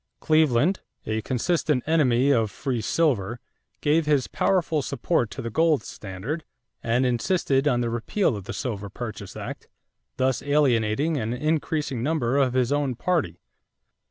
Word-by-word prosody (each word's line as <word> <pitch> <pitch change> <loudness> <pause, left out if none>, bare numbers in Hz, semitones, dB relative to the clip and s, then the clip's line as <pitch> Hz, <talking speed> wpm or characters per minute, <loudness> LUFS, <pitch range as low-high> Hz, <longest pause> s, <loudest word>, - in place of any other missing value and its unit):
Cleveland, 155 +2 +3 0.3
a 110 0 -1
consistent 140 +2 0
enemy 140 -4 +3
of 115 -5 +2
free 125 +3 -3
silver, 120 - 0 0.4
gave 155 +1 +2
his 145 -4 +3
powerful 170 -5 +1
support 135 -2 0
to 130 +5 -7
the 115 - -4
gold 160 +3 +2
standard 105 - -6 0.4
and 120 +3 +1
insisted 135 +2 +1
on 125 -4 +2
the 120 - 0
repeal 120 - 0
of 100 -3 -7
the - - -5
Silver 105 -6 -4
Purchase 105 -2 -7
Act, - - -7 0.5
thus 130 -2 +1
alienating 140 0 +2
an 115 -2 -2
increasing 150 -2 -1
number 135 -2 0
of 130 -3 +2
his 130 0 +1
own 145 -3 0
party. 130 - -1
130 Hz, 145 wpm, -25 LUFS, 115-155 Hz, 0.5 s, Cleveland